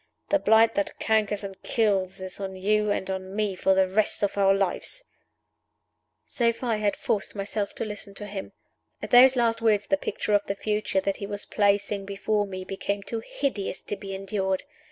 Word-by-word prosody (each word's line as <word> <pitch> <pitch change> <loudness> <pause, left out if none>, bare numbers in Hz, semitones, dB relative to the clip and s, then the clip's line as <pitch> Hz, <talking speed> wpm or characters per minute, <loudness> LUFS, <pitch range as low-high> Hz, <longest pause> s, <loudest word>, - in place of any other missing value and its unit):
The 300 - +3
blight 220 -1 +5
that 200 - -2
cankers 215 -2 +1
and 195 -1 -8
kills 195 -4 0
is 185 +1 -6
on 190 -1 -4
you 210 +3 +1
and 205 - -1
on 190 0 -4
me 210 -2 0
for 190 +1 +2
the 190 0 +4
rest 205 +2 +1
of 200 - +1
our 195 -1 +4
lives!" 195 - -1 1.2
So 235 -2 +1
far 235 +1 -3
I 220 - +1
had 210 -1 +1
forced 210 0 -2
myself 200 +1 -3
to - - -2
listen 210 -1 -7
to 205 - -6
him. 200 -1 -6 0.5
At - - -5
those 255 +2 +8
last 230 -2 +1
words 210 -3 +3
the 290 - +2
picture 210 -5 -2
of 205 0 +4
the 200 - -1
future 210 -2 0
that 195 0 -1
he 200 - -5
was 205 0 -5
placing 200 -1 +1
before 205 +1 -1
me 185 -1 -6
became 200 +1 -3
too 230 +3 -4
hideous 225 -10 -3
to - - -3
be 195 -1 -6
endured. 190 -1 -1
205 Hz, 195 wpm, -26 LUFS, 195-215 Hz, 1.2 s, those